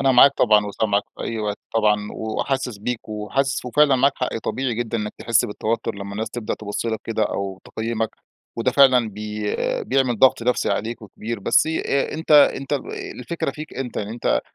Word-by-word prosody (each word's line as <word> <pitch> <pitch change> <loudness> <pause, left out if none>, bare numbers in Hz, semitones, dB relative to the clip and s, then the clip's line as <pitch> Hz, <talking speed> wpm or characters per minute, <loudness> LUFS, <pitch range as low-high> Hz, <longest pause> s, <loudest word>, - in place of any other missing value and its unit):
أنا 135 -1 +4
معاك 135 +3 +8
طبعًا 105 -3 +4
وسامعك 100 0 0
في - - -6
أي 115 -1 -3
وقت 105 -1 -2 0.2
طبعًا 105 -2 +2
وحاسِس 120 +1 -2
بيك 120 +2 -4
و 105 -1 -4
وحاسِس 135 +1 0
وفعلًا 140 +2 +4
معاك 140 +2 +4
حق 125 -3 -2
طبيعي 120 +1 -1
جدًا 115 0 -2
إنّك 105 -1 -3
تحِس 115 0 +2
بالتوتُّر 110 +2 -2
لمّا 100 0 -7
الناس 110 +3 -3
تبدأ 120 -3 -3
تِبُص 105 +2 -4
لك 110 -1 -2
كده 110 -1 -1
أو 100 -2 -2
تقيّمَك 115 0 -2 0.5
وده 115 - +1
فعلًا 130 -4 +5
بي 105 0 -4 0.3
بيعمل 130 -3 +1
ضَغْط 130 -1 +5
نَفْسي 125 +1 +1
عليك 115 +1 -2
وكبير، 110 +2 -6
بس - - +3
آآ، 150 -3 0
أنت 160 0 -7
أنت 145 -1 +5
آآ 145 - +3 0.4
الفكرة 160 +4 -3
فيك 155 +3 -9
أنت، 130 -2 -5
يعني 105 0 -3
أنت 120 - 0
115 Hz, 190 wpm, -22 LUFS, 105-130 Hz, 0.5 s, معاك